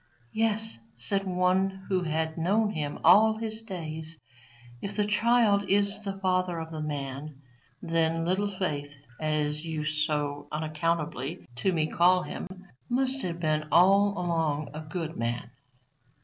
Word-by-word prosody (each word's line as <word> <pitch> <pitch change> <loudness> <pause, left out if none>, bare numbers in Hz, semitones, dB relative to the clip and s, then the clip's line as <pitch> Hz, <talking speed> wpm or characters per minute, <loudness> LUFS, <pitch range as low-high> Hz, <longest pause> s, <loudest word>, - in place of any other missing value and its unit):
Yes, 220 - +2 0.2
said 195 - +1
one 190 +1 +1
who 190 -2 +1
had 160 -1 -1
known 205 +6 +1
him 150 -5 -3
all 220 +1 +6
his 220 0 -1
days, 160 -6 -6 0.6
if 200 - -5
the 210 - +1
child 210 -1 +3
is 200 +1 +3
the 195 -2 -5
father 185 -2 0
of 160 0 -6
the 155 -1 -5
man, 140 -1 -5 0.4
then 165 -1 +1
Little 190 +4 +1
Faith, 150 -7 -3 0.2
as 150 -1 -1
you 160 -2 -3
so 150 -2 -1
unaccountably 155 -1 -2
to 190 +9 +1
me 160 -3 +1
call 180 +3 +3
him, - - -6 0.4
must 265 +2 0
have 170 -4 -3
been 155 -2 0
all 195 +4 +5
along 165 -4 -1
a 155 - -6
good 160 0 -5
man. 120 +1 -3
170 Hz, 140 wpm, -28 LUFS, 155-195 Hz, 0.6 s, all